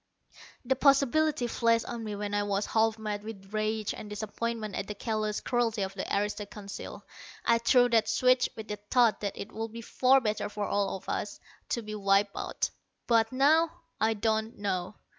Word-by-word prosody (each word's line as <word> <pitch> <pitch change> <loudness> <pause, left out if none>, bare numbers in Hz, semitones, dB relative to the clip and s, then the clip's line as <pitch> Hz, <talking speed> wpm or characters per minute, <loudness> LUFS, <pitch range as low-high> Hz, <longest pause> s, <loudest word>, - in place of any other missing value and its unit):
The 265 +2 +2
possibility 275 +1 +3
flashed 230 -1 +2
on 235 -1 -5
me 210 -1 -4
when 205 0 -4
I 205 - +2
was 205 0 0
half 225 0 +2
mad 210 -1 -4
with 205 -2 -9
rage 215 0 -1
and 210 - -8
disappointment 215 +1 -4
at - - -3
the 210 - -5
callous 215 0 -2
cruelty 235 -4 0
of 190 0 -4
the 190 - -5
aristo 205 +1 -1
Council. 205 -3 -8 0.4
I 230 0 +4
threw 245 +1 +5
that 225 -2 +3
switch 255 0 +3
with 220 -1 -8
the 210 - -4
thought 225 +2 +2
that 200 -2 -3
it 200 - -7
would 225 0 -5
be 230 +1 -7
far 260 +4 +4
better 215 -4 -2
for 210 0 -3
all 200 -1 0
of 190 - -10
us 205 - -3 0.3
to 235 - -1
be 215 0 -6
wiped 200 0 +2
out. - - -2 0.3
But 225 -2 +3
now, 305 +5 +4 0.3
I 220 0 +2
don't 220 +1 -1
know. 190 -1 -2
220 Hz, 190 wpm, -29 LUFS, 205-235 Hz, 0.4 s, threw